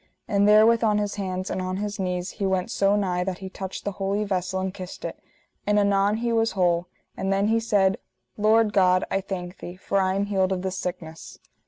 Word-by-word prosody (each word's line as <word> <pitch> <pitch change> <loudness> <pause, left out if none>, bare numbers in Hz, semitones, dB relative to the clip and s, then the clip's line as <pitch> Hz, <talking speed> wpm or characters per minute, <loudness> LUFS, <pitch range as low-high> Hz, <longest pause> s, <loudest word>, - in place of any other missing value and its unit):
And 200 0 +3
therewith 220 +2 +6
on 210 -2 +3
his 205 -1 -1
hands 185 -2 -4
and - - -2
on 185 0 -3
his 205 +1 -4
knees 180 -1 -2
he 200 - -4
went 190 -1 -1
so 200 +1 +2
nigh 180 -3 0
that 185 -1 -3
he 190 -1 -8
touched 190 -1 -6
the 205 - -1
holy 200 +2 0
vessel 190 -2 -2
and 190 0 -3
kissed 185 -2 -8
it, - - -6 0.5
and 210 0 +3
anon 200 0 +3
he 235 0 -1
was 225 0 +1
whole; 175 -2 +1 0.3
and 190 0 -2
then 200 +2 +2
he 225 +1 +3
said: 200 -4 +2 0.4
Lord 215 0 +3
God, 185 -2 +4
I 195 - +1
thank 185 -1 -6
thee, 175 - -8
for 195 +1 -1
I 190 0 +1
am 200 +1 0
healed 195 -2 +1
of 185 -1 -2
this 190 0 -3
sickness. 165 -3 -6
195 Hz, 220 wpm, -25 LUFS, 185-205 Hz, 0.5 s, therewith